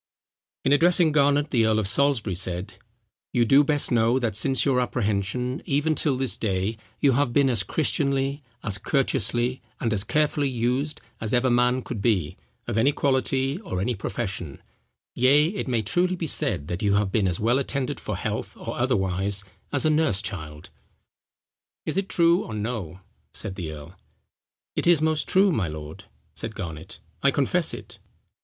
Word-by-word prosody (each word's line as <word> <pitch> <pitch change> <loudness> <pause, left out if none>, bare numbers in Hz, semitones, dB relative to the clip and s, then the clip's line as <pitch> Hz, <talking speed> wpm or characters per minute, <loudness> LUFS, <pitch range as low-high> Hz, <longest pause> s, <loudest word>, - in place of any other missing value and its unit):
In 135 - +3
addressing 170 +1 +4
Garnet, 145 0 +2
the 115 -4 +3
earl 110 -1 +2
of 110 -3 0
Salisbury 125 -4 +1
said: 90 +2 -3 0.6
"You 120 -2 +3
do 135 +5 +6
best 145 -1 0
know 115 +1 +3
that 115 -5 -1
since 130 +3 +2
your 135 -3 +3
apprehension, 120 +2 -1
even 150 +3 +1
till 145 -3 0
this 130 -2 -1
day, 100 +1 -1 0.2
you 140 - +4
have 130 -1 +1
been 135 -1 +4
as 120 - +1
Christianly, 140 -2 0 0.2
as 100 -2 -1
courteously, 125 0 +1 0.2
and 115 -2 0
as 100 -2 +1
carefully 150 +1 +1
used, 125 +4 -1 0.2
as 110 +2 0
ever 125 +1 +2
man 125 +1 +2
could 110 -5 -5
be, 95 -9 +1 0.3
of 110 - -1
any 135 +6 +4
quality, 135 +1 0
or 180 - -4
any 115 +6 0
profession; 95 -8 -5 0.5
yea, 145 +5 +4
it 200 -5 -4
may 120 -4 0
truly 180 - +1
be 170 - -4
said, 90 - +1
that 90 +1 -4
you 100 -1 +2
have 100 -2 +1
been 100 -1 +2
as 90 -2 -2
well 120 +5 +2
attended 140 -1 -2
for - - -4
health - - -4
or - - -6
otherwise, 95 +1 0 0.3
as 140 +1 0
a 155 - +4
nurse 150 -11 +1
child. 80 -8 -7 1.1
Is - - -2
it 195 0 -1
true 170 +1 +3
or 110 - -7
no?" 105 -5 -4 0.3
said 100 -4 -5
the 85 -4 -5
earl. 75 +2 -10 0.8
"It - - 0
is 170 -3 +6
most 155 -1 +1
true, 195 +1 +5
my 105 - 0
lord," 75 0 -8 0.3
said 110 -1 -6
Garnet, 80 -4 -7 0.2
"I - - +4
confess - - +2
it." - - -10
120 Hz, 175 wpm, -25 LUFS, 100-140 Hz, 1.1 s, do